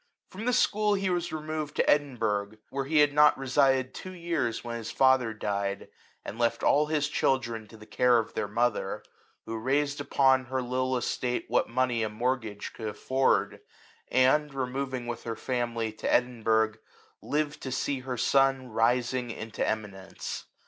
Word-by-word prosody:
From 205 +4 -7
the 250 - +2
school 210 -3 +2
he 195 -1 0
was 175 -1 -1
removed 155 -1 -4
to - - +2
Edin^ 145 -3 +2
burgh, 105 -1 -1
where 135 0 -2
he 150 +1 +4
had 145 -1 +3
not 150 0 +6
resided 135 -1 +2
two 185 -1 -8
years 170 -9 -2
when 120 -1 -5
his 115 -1 -6
father 130 -3 +3
died, 100 -2 -3 0.4
and 110 - -7
left 115 -1 +1
all 150 +1 +4
his 150 -2 +1
chil 135 -2 +2
dren 115 -3 -7
to 110 - -14
the 110 - -13
care 125 +2 +3
of 115 - -2
their - - -2
mother, 115 +2 -1 0.4
who 115 0 -4
raised 145 +4 0
upon 130 -2 +3
her 130 +2 -2
little 130 +1 0
estate 125 0 -2
what - - +1
money 120 -1 +1
a 110 - 0
mort 125 +4 0
gage 105 -2 -7
could 110 - -6
afford, 130 +5 +1 0.5
and, 135 +3 +3
removing 130 -1 -3
with 120 -1 -5
her 115 -1 -4
family 120 -3 -2
to 110 - -3
Edinburgh, 110 -3 +2 0.4
lived 150 0 -2
to 130 - -5
see 135 +1 -1
her 130 -1 -5
son 135 0 +2
rising 120 +2 +1
into 110 -1 -4
eminence. 100 -3 -4
130 Hz, 175 wpm, -28 LUFS, 115-140 Hz, 0.5 s, not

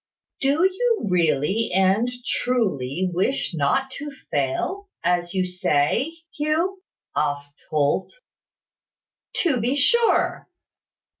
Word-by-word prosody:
"Do 280 +5 +2
you 435 - +1
really 170 +5 +2
and 195 +5 +3 0.2
truly 185 - 0
wish 190 +5 0
not 170 - +1
to 295 +1 -5 0.2
fail, 260 - -1
as 175 0 0
you 185 -1 +2
say, 180 - +1 0.2
Hugh?" 325 +6 0 0.3
asked 145 0 -2
Holt. 150 +4 +1 1.3
"To 315 -8 +2
be 245 +5 +1
sure." 460 +11 +3
200 Hz, 95 wpm, -23 LUFS, -, 1.3 s, and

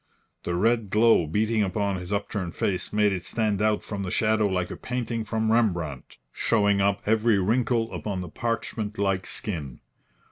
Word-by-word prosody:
The 85 - -1
red 115 +2 +2
glow 110 -4 +4
beating 110 +6 +1
upon 100 0 0
his 90 +1 -7
upturned 100 -3 -2
face 95 -2 -1
made 105 -1 +3
it 90 -2 -4
stand 105 +2 0
out 110 0 +2
from 100 -2 -5
the 95 - -3
shadow 110 +2 +2
like 90 -2 -1
a - - -4
painting 120 -2 -3
from 110 0 -1
Rembrandt, 85 - 0
showing 100 -1 +2
up 100 0 +1
every 110 0 +3
wrinkle 115 +3 +1
upon 100 -3 -3
the 90 - -6
parchment 110 0 -3
like 95 -2 0
skin. 75 - -5
105 Hz, 170 wpm, -26 LUFS, 95-110 Hz, -, glow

